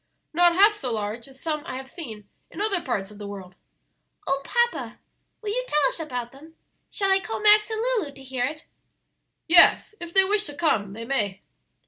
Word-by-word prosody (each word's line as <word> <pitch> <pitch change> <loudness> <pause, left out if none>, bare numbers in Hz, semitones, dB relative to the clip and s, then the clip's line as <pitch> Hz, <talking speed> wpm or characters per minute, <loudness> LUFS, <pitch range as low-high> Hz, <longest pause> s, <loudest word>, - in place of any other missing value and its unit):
"Not 345 +1 +4
half 410 +3 +6
so 255 - -5
large 215 +2 -4
as 265 -1 -15
some 305 -1 -2
I 255 - -6
have 265 0 -7
seen 230 - -9 0.2
in - - -10
other 405 -4 +1
parts 210 -9 -3
of 210 - -14
the 205 - -7
world." 190 -2 -9 0.7
"Oh, 275 0 0
papa, 475 +8 -1 0.5
will 415 - -2
you - - -1
tell 295 - +3
us - - -9
about 250 -6 -5
them? 310 +4 -16 0.3
Shall 390 -1 0
I 385 - +5
call 445 - -5
Max 425 0 +5
and 440 -1 -3
Lulu 465 -12 0
to 270 - -13
hear 260 -2 -2
it?" 305 +1 -8 0.8
"Yes; 345 +4 +6
if 345 -1 -8
they 385 +2 +5
wish 410 +2 +1
to 290 - -7
come, 220 - 0
they 230 +2 -7
may." 210 -7 -2
300 Hz, 200 wpm, -25 LUFS, 240-390 Hz, 0.8 s, half